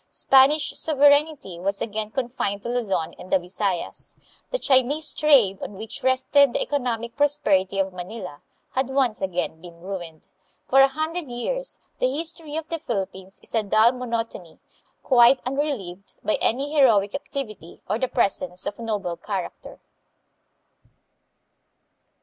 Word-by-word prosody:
Spanish 275 +3 +4
sovereignty 290 - +2
was 200 +2 -2
again 215 -1 -3
confined 220 -5 -3
to - - -5
Luzon 215 -9 -1
and 185 - -11
the - - +5
Bisayas. 185 0 -4 0.3
The - - -1
Chinese 285 - +2
trade, 250 -11 +4
on - - -6
which 220 +4 -7
rested 260 +1 +3
the - - 0
economic 235 -4 -2
prosperity 210 -10 +1
of 190 -1 0
Manila, 180 -3 -8 0.3
had 260 0 0
once 265 -4 0
again 180 -3 -2
been 170 -1 -13
ruined. 175 -4 -7 0.4
For 270 +1 +6
a 270 - +7
hundred 315 +2 -4
years - - -4 0.2
the 255 - +2
history 315 +1 -4
of 320 -1 -4
the 330 - -3
Philippines 195 - -5
is - - -12
a 225 - +2
dull 215 +3 +4
monotony, 230 -8 -5 0.5
quite 250 0 +6
unrelieved 250 -9 -3
by - - 0
any 275 +6 0
heroic 220 -9 +4
activity 215 - -7
or 210 +4 -1
the 260 - 0
presence 185 -7 0
of 205 - -4
noble 210 -6 -3
character. 190 0 -6
235 Hz, 140 wpm, -24 LUFS, 195-275 Hz, 0.5 s, a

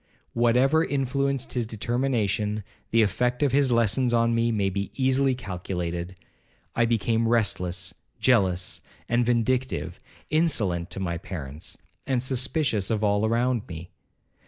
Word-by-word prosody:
Whatever 125 +7 +3
influenced 140 -1 -1
his 120 -3 -1
determination, 110 -3 -1 0.3
the 115 0 +4
effect 125 +6 0
of 140 - +2
his 135 -2 +3
lessons 120 +2 +2
on 115 0 +3
me 115 0 +2
may 100 -3 0
be 100 0 -3
easily 130 0 +2
calculated. 90 -5 -4 0.6
I 120 - +3
became 115 0 +1
restless, 90 -6 0 0.3
jealous, 95 -8 +2 0.3
and 120 +1 +2
vindictive;—insolent 120 - -1
to - - -5
my 85 -3 -2
parents, 75 -5 -6 0.3
and 130 -2 +1
suspicious 130 - +1
of 110 -1 0
all 105 +1 +2
around 120 0 0
me. 85 +1 -8
115 Hz, 125 wpm, -26 LUFS, 100-130 Hz, 0.6 s, the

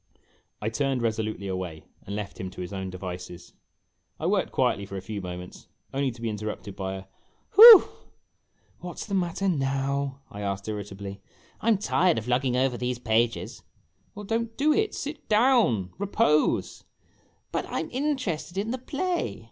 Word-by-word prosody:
I 110 - 0
turned 135 +1 -1
resolutely 110 -3 -2
away 90 -4 -4 0.2
and 100 - -4
left 105 -1 -6
him 95 - -4
to 90 - -9
his 90 +2 -6
own 95 -1 -4
devices. 90 -1 -8 0.7
I - - -4
worked - - +1
quietly 100 - +1
for 100 - -6
a - - -3
few 105 -1 -5
moments, 90 0 -8 0.3
only 135 0 +1
to 120 -1 -10
be - - 0
interrupted 105 -2 -5
by 95 -1 -4
a 95 - -7 0.5
"Whew!" 445 -1 +11 0.9
"What 175 -1 -8
's - - -5
the 200 - -6
matter 185 +1 0
now?" 140 -3 -1
I 100 - -7
asked, 100 0 -3
irritably. 100 -1 -6 0.2
" - - -30
I - - -4
'm 225 -3 +5
tired 185 -3 +2
of 110 +1 -4
lugging 125 0 +1
over 130 -1 +1
these 125 0 -2
pages! 115 0 0 0.3
" 90 - -42
"Well, 205 0 -7
don't 225 +1 -2
do 300 +2 +3
it. 430 +3 0
Sit 295 +2 -6
down. 215 - +3
Repose." 200 -6 +1 0.3
" - - -39
But - - -2
I - - -2
'm - - -7
interested 255 - -2
in 210 +3 -1
the 255 - -3
play 345 +7 -2
125 Hz, 180 wpm, -26 LUFS, -, 0.9 s, Whew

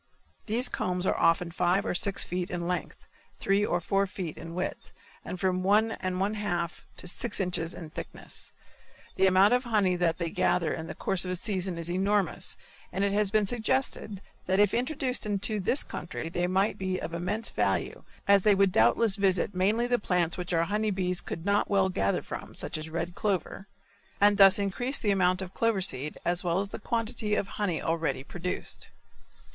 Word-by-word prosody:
These 230 +4 +1
combs 180 0 -2
are - - +2
often 170 +1 +2
five 180 +4 +1
or - - 0
six 195 +2 +2
feet 180 0 -3
in 175 -1 -3
length, 180 -1 -4 0.3
three 195 +1 +2
or 175 -4 +1
four 195 +3 +1
feet 180 -4 -5
in 165 0 -8
width 180 - -4 0.3
and 180 - -6
from 185 -1 +1
one 210 +4 +3
and 185 -3 -3
one 200 +2 +1
half 175 -5 -3
to - - -7
six 210 +5 -2
inches 175 -3 -1
in 160 -3 -9
thickness. - - -8 0.6
The 190 - +4
amount 190 +4 +5
of 250 +1 +2
honey 205 -6 +2
that 170 -2 +1
they 170 -2 -3
gather 180 -3 +1
in 160 -1 -5
the - - -6
course 190 - +1
of 180 - -3
a 185 - -1
season 185 -2 -2
is 170 -1 -5
enormous 190 +1 0 0.3
and 190 +2 -1
it 200 0 +1
has 210 -1 +2
been 215 0 +2
suggested 220 -2 -1 0.3
that 190 +1 +2
if 205 -1 +4
introduced 255 -2 -1
into 205 +1 0
this 225 +9 +1
country 165 0 -6
they 175 +1 -1
might 190 +3 +1
be 185 -1 -1
of 165 +1 -5
immense 200 +7 -2
value - - -1 0.2
as 200 -1 +6
they 210 +1 +4
would 195 -1 +3
doubtless 220 +2 +3
visit 195 0 +1
mainly 205 +6 +2
the 245 0 +1
plants 175 -4 +1
which 180 0 -5
our 165 -1 +3
honey 210 +4 0
bees 180 -3 0
could 165 - -6
not 200 0 +2
well 195 -2 +3
gather 100 - 0
from, - - -7
such - - -4
as 155 +1 -4
red 170 +2 -3
clover, 195 0 -2 0.5
and 205 0 +4
thus 195 -1 +8
increase 225 +7 -1
the 205 - 0
amount 185 -1 +2
of 185 - -9
clover 230 -3 +1
seed 150 -6 -3
as 175 0 +2
well 175 0 +1
as 200 0 -2
the - - -7
quantity 220 -1 -1
of 195 - -1
honey 195 -6 -1
already 160 -5 -1
produced. 175 +5 -4
190 Hz, 195 wpm, -28 LUFS, 175-205 Hz, 0.6 s, thus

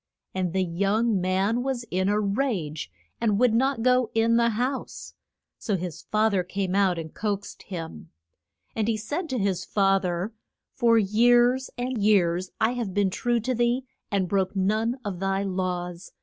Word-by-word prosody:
And 185 -2 -1
the 190 +1 +1
young 200 +4 +1
man 190 +6 +1
was 260 -2 -2
in 185 +2 +1
a 210 +1 +2
rage, 200 - -1 0.3
and 215 -4 +2
would 250 -2 +4
not 260 0 +1
go 250 -1 +3
in 225 +1 +3
the 235 0 +4
house; 250 +5 -3 0.5
so 205 -3 -1
his 175 -3 -6
fa 215 +1 +3
ther 195 -2 +2
came 185 +1 -3
out 195 -3 +3
and 160 -1 -6
coaxed 205 -2 -4
him. 160 - -7 0.7
And 220 -1 0
he 225 -1 +1
said 295 - -4
to 260 - -1
his 195 -4 0
fa 195 0 +2
ther, 180 +4 -2 0.4
For 235 -3 +3
years 240 +5 +4
and 245 -2 -2
years 185 -3 +3
have 240 +3 +1
I - - -7
been 200 0 +1
true 240 +4 0
to 255 +4 -1
thee 240 +2 +1 0.2
and 195 -2 0
broke 190 +1 0
none 215 +6 +1
of 190 -4 -4
thy 195 +1 0
laws. 180 -2 -3
205 Hz, 175 wpm, -26 LUFS, 185-235 Hz, 0.7 s, would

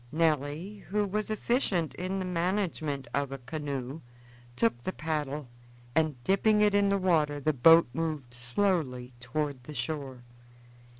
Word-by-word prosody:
Nelly, 160 +5 0
who 210 +1 +1
was 210 +2 -2
efficient 215 - 0
in 185 +2 -3
the 190 - -2
management 170 -6 -1
of 140 -1 0
a 135 - -4
canoe, 140 +1 -5 0.5
took 120 0 +1
the 185 - -2
paddle, 150 -4 -3 0.5
and 155 -1 +2
dipping 210 - +3
it 210 -1 +4
in 200 0 +4
the 200 - +3
water 155 -6 +2
the 155 +2 +1
boat 165 +6 +7
moved 150 -5 -3
slowly 125 -1 -1
toward 135 +1 -3
the 150 - -8
shore. 140 -6 -4
155 Hz, 140 wpm, -29 LUFS, 135-185 Hz, 0.5 s, boat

